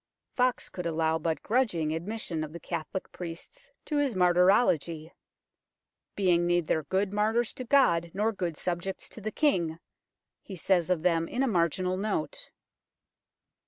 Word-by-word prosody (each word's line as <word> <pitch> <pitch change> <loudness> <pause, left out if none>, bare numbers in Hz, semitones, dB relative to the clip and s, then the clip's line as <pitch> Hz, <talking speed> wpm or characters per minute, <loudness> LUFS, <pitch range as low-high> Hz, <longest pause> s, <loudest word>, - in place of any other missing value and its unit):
Foxe 250 -1 +1
could 180 -2 -5
allow 160 0 +1
but 160 0 -2
grudg 240 -3 +1
ing 155 -2 -1
admission 170 -2 -4
of 155 0 -7
the 170 - -7
Catholic 160 +4 -5
priests 170 +9 -9 0.2
to 300 - -1
his 280 -6 +1
martyrology, 175 - +3 0.5
" - - -59
being 175 -3 +2
neither 175 -2 +1
good 190 +6 -1
martyrs 220 +3 +1
to 255 - -6
God 170 -11 +3
nor 210 +5 0
good 175 -7 -3
subjects 180 +2 -3
to 225 - -11
the 215 +1 -3
King," 175 - +1 0.6
he 195 - -9
says 180 0 +1
of 175 -3 +1
them 165 -2 +2
in 255 - -1
a - - +2
marginal 185 - +1
note. 195 -5 -3
180 Hz, 155 wpm, -28 LUFS, 165-210 Hz, 0.6 s, martyrology